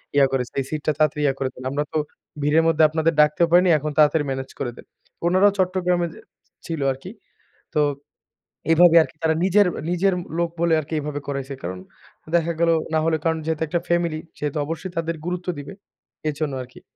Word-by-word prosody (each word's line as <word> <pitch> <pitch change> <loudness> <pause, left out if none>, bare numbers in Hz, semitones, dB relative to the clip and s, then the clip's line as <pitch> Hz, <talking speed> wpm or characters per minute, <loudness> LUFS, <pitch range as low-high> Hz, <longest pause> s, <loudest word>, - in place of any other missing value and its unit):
ইয়া 140 -1 +6
করেছে 125 -2 -2
এই - - -5
সিটটা 155 0 -1
তাড়াতাড়ি 150 -1 +1
ইয়া 135 - +3
করে 130 -1 -1
দেন। 130 - -11
আমরা 145 +1 0
তো - - +1 0.4
ভিড়ের 150 +3 +3
মধ্যে 160 -1 +3
আপনাদের 160 +1 +1
ডাকতেও 150 +3 +3
পারিনি। 180 +1 +5
এখন 150 +1 -3
তাড়াতাড়ি 150 0 +4
মেনেজ 135 0 -4
করে 125 -3 -2
দেন। - - -12 0.4
উনারাও 185 +3 +5
চট্টগ্রামে 180 -1 +1 0.6
ছিল 165 -2 -4
আরকি। 135 +8 -8 0.6
তো 150 - +3 0.9
এভাবে 170 0 +6
আরকি 155 - -8
তারা 160 0 +2
নিজের, 195 +1 +4 0.2
নিজের 180 +2 +2 0.2
লোক 170 -1 +1
বলে 170 -1 +2
আরকি 155 +2 -6
এভাবে 145 0 -4
করাইছে। 140 0 -4
কারণ 90 +1 -5 0.6
দেখা 170 0 +1
গেল 170 - +4 0.2
না - - +4
হলে 160 -1 +2
কারণ 160 -1 +1
যেহেতু 160 -1 -2
একটা 170 +2 0
ফ্যামিলি 170 -2 +1 0.2
সেহেতু 150 0 -2
অবশ্যই 165 +4 -5
তাদের 165 0 -2
গুরুত্ব 180 0 -4
দিবে। 145 +7 -7 0.6
এজন্য 150 -1 -2
আরকি। 125 0 -14
160 Hz, 180 wpm, -23 LUFS, 145-170 Hz, 0.9 s, ইয়া